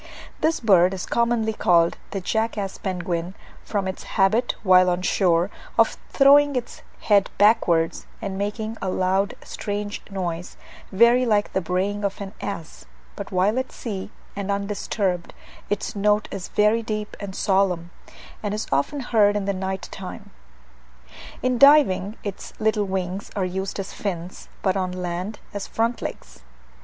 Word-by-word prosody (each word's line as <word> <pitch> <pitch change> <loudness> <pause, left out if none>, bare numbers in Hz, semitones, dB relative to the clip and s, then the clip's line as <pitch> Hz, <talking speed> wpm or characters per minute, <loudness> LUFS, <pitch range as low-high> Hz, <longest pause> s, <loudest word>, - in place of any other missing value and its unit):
This 320 +1 +1
bird 190 -4 +4
is 185 - -5
commonly 235 -2 +1
called 170 -4 +3
the 195 - -3
jackass 215 -1 -2
penguin, 180 -1 -3 0.3
from 200 -3 -2
its 190 - -4 0.2
habit, 215 +6 +3
while 185 -2 +6
on 180 +1 -1
shore, 180 0 +2 0.3
of - - +4
throwing 285 +1 +6
its 245 -1 -4 0.2
head 200 -2 +3
backwards, 190 -6 +3
and 190 - -4
making 215 +3 -3
a 190 - -1
loud 190 +2 +1
strange 205 0 -4
noise, 180 -3 -4 0.3
very 235 +5 +5
like 210 -4 +1
the 190 - +1
braying 190 +4 -1
of 200 -1 -2
an 200 0 -6
ass; 170 - -6 0.3
but - - -7
while 195 +6 +2
at 260 - -4
sea, 200 -5 -5 0.3
and 200 -1 -4
undisturbed, 200 -2 -2 0.3
its 205 +1 -2
note 210 +1 +2
is 195 -2 -5
very 210 +2 +3
deep 215 -1 -4
and 200 -2 -6
solemn, 190 -4 +1 0.5
and 210 -1 -2
is 215 - -3
often 275 - 0
heard 210 -4 +3
in 205 -1 -1
the 200 - 0
night 190 0 -3
time. 190 -1 -8 1.1
In 255 -1 +1
diving, 245 -9 +6
its 200 -3 -6
little 215 -1 +1
wings 190 0 -3
are 195 -3 0
used 190 +2 -3
as 195 - -5
fins; 180 -3 -5
but 190 -1 +2
on 185 -1 0
the - - -7
land, 180 +4 -4 0.2
as 205 -1 -4
front 230 +1 -1
legs. - - -7
200 Hz, 155 wpm, -23 LUFS, 185-215 Hz, 1.1 s, while